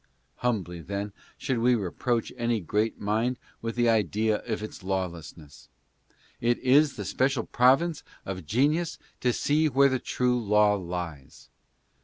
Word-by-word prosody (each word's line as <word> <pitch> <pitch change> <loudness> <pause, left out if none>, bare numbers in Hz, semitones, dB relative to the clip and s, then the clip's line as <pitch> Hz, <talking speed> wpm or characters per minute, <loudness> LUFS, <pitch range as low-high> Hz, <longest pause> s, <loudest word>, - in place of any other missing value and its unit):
Humbly, 95 -8 -2
then, 100 +3 -4 0.2
should 130 -3 -1
we 125 +2 +4
reproach 115 +3 -1
any 120 -2 0
great 105 +5 -1
mind 110 +5 0 0.2
with 115 0 -4
the 120 -1 +2
idea 110 0 +2
of 110 -2 -2
its 110 - -8
lawlessness. 85 -6 -5 0.7
It 120 +1 +2
is 140 +3 +4
the - - -5
special 130 -2 +1
province 135 +7 +3 0.2
of 90 -4 -6
genius 150 - +1 0.2
to 125 - +2
see 155 +5 +2
where 140 +1 +5
the 130 -1 0
true 125 -1 0
law 105 0 +4
lies. 85 -7 -6
115 Hz, 140 wpm, -27 LUFS, 95-125 Hz, 0.7 s, where